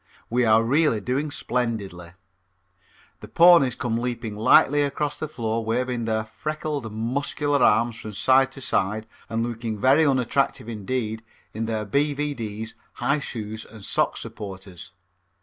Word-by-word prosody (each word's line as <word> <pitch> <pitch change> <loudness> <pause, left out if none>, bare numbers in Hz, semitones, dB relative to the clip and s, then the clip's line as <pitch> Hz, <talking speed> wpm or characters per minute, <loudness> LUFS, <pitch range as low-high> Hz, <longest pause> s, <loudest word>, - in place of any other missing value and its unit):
We 125 +1 +2
are 110 0 +5
really 140 -1 +2
doing 130 +8 -1
splendidly. 105 -11 -3 1.1
The - - -10
ponies 170 -8 +6
come 115 -2 -2
leaping 120 -3 -3
lightly 130 +6 +5
across 145 +1 -1
the 155 - -3
floor 115 -6 -2
waving 120 +1 -1
their 110 -1 -1
freckled, 150 0 -4
muscular 140 +5 -1
arms 115 +2 +3
from 110 -1 -8
side 130 +6 +3
to 135 - -10
side 110 -2 0 0.2
and 115 0 -1
looking 115 -2 -4
very 135 +9 +4
unattractive 135 -3 +1
indeed 110 0 -3 0.3
in 110 +1 -3
their 110 -1 -2
B.V.D.'s, 135 -4 -2 0.2
high 140 +5 0
shoes 110 -5 -6
and 110 -3 -12
sock - - 0
supporters. 95 -2 -8
115 Hz, 135 wpm, -24 LUFS, 110-140 Hz, 1.1 s, ponies